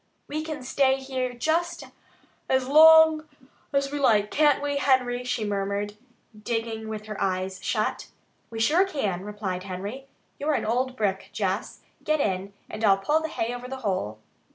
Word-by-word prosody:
"We 310 +2 -3
can 310 -4 -6
stay 265 +1 +2
here 260 -1 -3
just 320 +8 -1 0.7
as 260 -1 +2
long 315 +1 +7 0.4
as 275 -1 0
we 290 - -3
like, 210 -6 +3
can't 295 -2 +4
we, 285 0 -2
Henry?" 255 -2 +2
she 245 -3 -2
murmured, 200 0 -2 0.4
digging 225 0 -3
with 215 -1 -6
her 215 -1 -6
eyes 190 0 -1
shut. - - -1 0.4
"We 225 - -6
sure 310 +11 +4
can," 215 - -2
replied 205 -3 -4
Henry. 200 +8 -6 0.3
"You're 295 +1 +1
an - - -1
old 255 +3 0
brick, 195 -3 -1
Jess. 195 0 -2 0.2
Get 310 0 +1
in, 195 -4 -1 0.2
and 215 - -7
I'll 195 -2 +5
pull 300 +11 +1
the 320 - -2
hay 235 -6 -3
over 245 0 -7
the 265 +1 -6
hole." 110 - -1
245 Hz, 165 wpm, -26 LUFS, 205-285 Hz, 0.7 s, long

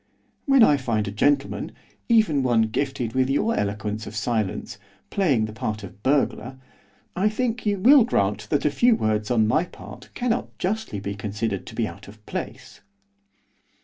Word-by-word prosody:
When 275 -3 +6
I 145 -8 +5
find 115 -6 -1
a - - -3
gentleman, 140 +7 0 0.4
even 215 -12 +4
one 120 -3 +3
gifted 120 0 -2
with 130 0 +1
your 210 +12 +1
eloquence 105 +1 -3
of 110 - -8
silence, 110 -3 -2 0.3
playing 140 - +2
the 110 - -8
part 110 -3 -4
of 100 +1 -11
burglar, 130 0 0 0.6
I 195 +4 +2
think 235 +1 -2
you 205 -1 +1
will 255 +7 +7
grant 105 - -1
that 145 - 0
a 150 - +3
few 240 +9 +4
words 110 - -1
on 110 -3 +3
my 155 +9 +2
part - - -12
cannot 245 -1 -2
justly 200 - -2
be 100 +1 -4
considered 105 0 -4
to - - -9
be - - 0
out - - -11
of 105 +1 -15
place. 125 +2 -7
125 Hz, 170 wpm, -24 LUFS, -, 0.6 s, will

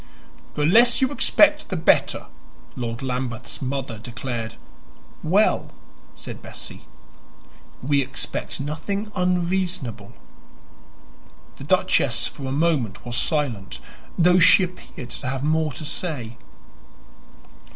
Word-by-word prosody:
"The 150 - +1
less 235 +8 +6
you 265 0 +2
expect, 300 +1 +4
the 190 - -2
better," 160 - +2 0.5
Lord 115 0 -4
Lambeth's 125 -2 -4
mother 130 -4 -3
declared. 115 -1 -5 0.7
"Well," - - +2 0.5
said - - -9
Bessie, - - -9 1.0
"we 140 +1 +2
expect 130 0 -4
nothing 180 +9 -3
unreasonable." 180 - -1 1.4
The - - -9
duchess - - +2
for 135 - -6
a - - -3
moment 145 -8 0
was 120 0 -4
silent, 130 - -1 0.4
though 180 +1 +5
she 185 +2 +7
appeared 180 -8 -7
to - - -5
have 130 +1 -2
more 155 0 +1
to 155 - -7
say. 130 -8 -4
145 Hz, 110 wpm, -23 LUFS, 125-180 Hz, 1.4 s, she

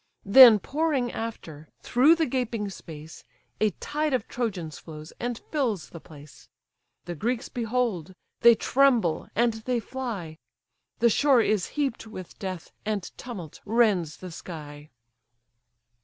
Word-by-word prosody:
Then 230 +2 +9
pouring 280 - -1
after, 160 -9 -7
through 275 +7 +5
the 330 -1 +1
gaping 235 -6 -2
space, 160 -4 -11 0.4
A 215 - +3
tide 300 -1 -1
of 240 - -3
Trojans 190 -10 -4
flows, 155 -1 -11
and 240 -1 -3
fills 235 - -1
the 170 - -9
place; 150 -2 -15 0.6
The 175 - -4
Greeks 235 - -2
behold, 225 - -2 0.2
they 235 0 +7
tremble, 240 - +2
and 235 +1 +2
they 235 +2 -2
fly; 220 -11 -6 0.6
The 235 -1 +3
shore 275 0 +4
is 215 -4 +1
heap'd 270 -6 -1
with 185 -5 -10
death, 185 -4 -6
and 210 -2 -2
tumult 190 -11 -9
rends 205 -8 +1
the 185 -1 -9
sky. 150 -3 -9
220 Hz, 130 wpm, -26 LUFS, 170-250 Hz, 0.6 s, Then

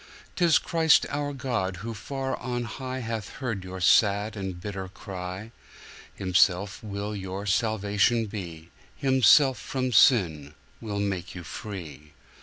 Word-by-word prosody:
'Tis 170 -3 +4
Christ 160 -2 +3
our 145 0 -2
God 120 -10 -2
who 115 - -4
far 135 +5 -4
on 120 -1 -3
highHath 115 -3 -5
heard 115 -8 -4
your 95 0 -7
sad 105 +3 +3
and 95 -3 -5
bitter 95 0 -5
cry; 95 +2 -7 0.6
Himself 95 +2 +2
will 105 0 -4
your 95 0 -5
Salvation 105 +3 +1
be, 85 -6 -8 0.2
Himself 130 0 +5
from 130 -1 -2
sin 80 - +4 0.3
will 105 -3 -3
make 95 -3 -3
you 90 - -7
free. 80 -6 -8
105 Hz, 125 wpm, -27 LUFS, 95-120 Hz, 0.6 s, Himself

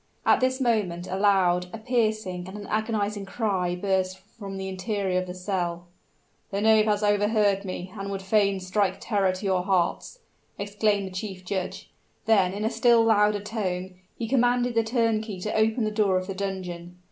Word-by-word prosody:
At - - +5
this 260 +1 +1
moment 210 -9 0
a 185 - -4
loud, 185 -3 +3
a 225 - -6
piercing, 215 -6 -1
and 190 +2 -8
an 205 - -8
agonizing 215 -1 -1
cry 190 -4 -1
burst 185 0 0
from 195 0 -9
the 190 0 -4
interior 190 -1 -1
of 185 - -7
the 180 - -6
cell. 180 -2 -3 0.6
"The 200 - -2
knave 215 0 +5
has 210 -1 +1
overheard 205 -1 +2
me, 185 0 -5
and 195 -1 -5
would 195 -1 -4
fain 200 -1 +2
strike 190 +1 0
terror 200 -4 +1
to 185 +2 -6
your 190 -2 +2
hearts!" 185 - 0 0.4
exclaimed 205 0 0
the 190 - -7
chief 185 -1 -6
judge; 190 -1 -4 0.3
then 195 -5 +4
in 205 +3 -3
a 220 - +1
still 235 -2 +4
louder 210 -2 +3
tone, 190 -4 -3 0.2
he 230 - -3
commanded 245 0 +2
the 230 0 +2
turnkey 225 -3 0
to 210 - -3
open 220 +2 +2
the 215 - 0
door 205 -3 +2
of 185 - -2
the 195 - -4
dungeon. 180 -3 -5
200 Hz, 180 wpm, -26 LUFS, 185-215 Hz, 0.6 s, At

